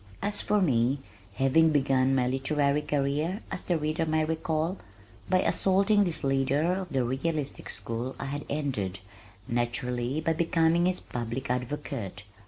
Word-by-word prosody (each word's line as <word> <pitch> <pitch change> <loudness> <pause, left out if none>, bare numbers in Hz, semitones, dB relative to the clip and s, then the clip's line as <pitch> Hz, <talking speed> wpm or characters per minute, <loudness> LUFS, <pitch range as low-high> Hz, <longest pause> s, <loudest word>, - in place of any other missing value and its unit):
As 205 0 -1
for 210 0 +2
me, 130 -4 +2 0.4
having 145 +6 +4
begun 135 -3 +3
my 125 -2 +2
literary 140 +2 +1
career 150 +7 -1
(as - - -3
the 175 - +1
reader 155 +1 -1
may 155 0 +2
recall) 160 +2 -1 0.5
by 185 0 +4
assaulting 200 +2 +3
this 170 -4 -1
leader 135 +5 +2
of 185 -1 -3
the 135 -5 +1
realistic 140 +4 -2
school 115 +5 -4
I - - -5
had 145 +1 -4
ended, 110 -11 -2 0.5
naturally, 120 +3 -1
by 160 +1 +1
becoming 165 +1 +2
his 185 0 +1
public 120 +2 -4
advocate. 125 -5 -4
145 Hz, 145 wpm, -28 LUFS, 130-165 Hz, 0.5 s, having